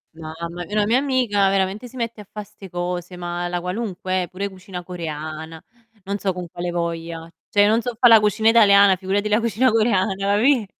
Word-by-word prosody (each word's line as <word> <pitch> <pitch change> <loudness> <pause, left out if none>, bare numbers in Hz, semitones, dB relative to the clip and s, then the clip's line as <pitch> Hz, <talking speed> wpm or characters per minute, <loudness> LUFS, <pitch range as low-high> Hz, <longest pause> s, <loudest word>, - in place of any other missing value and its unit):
No 160 -1 -8
vabbè, 170 +2 -6
una 210 -1 +2
mia 235 +4 +3
amica 245 -8 +1
veramente 195 +5 -1
si 255 - -16
mette 230 -3 -4
a 200 - -15
fa' 210 - -6
'ste 195 -1 -14
cose, 175 0 -4
ma 175 0 -4
la 175 0 -2
qualunque, 185 -1 -3
eh, - - -6
pure 195 +2 -4
cucina 185 -1 -9
coreana. 160 -2 -6 0.4
Non 200 +1 -2
so 195 -1 -1
con 180 -1 -6
quale 175 +1 -4
voglia. 165 -1 -4 0.2
Cioè 205 - +3
io 205 - +6
non 220 +2 +3
so 240 0 -4
fa' 245 - +7
la 225 -1 +8
cucina 210 +1 +2
italiana, 200 -4 +6
figurati 195 +3 -1
la 210 +2 +3
cucina 235 +3 +2
coreana, 215 -4 +2
capì, 210 +6 +2
195 Hz, 205 wpm, -21 LUFS, 175-215 Hz, 0.4 s, la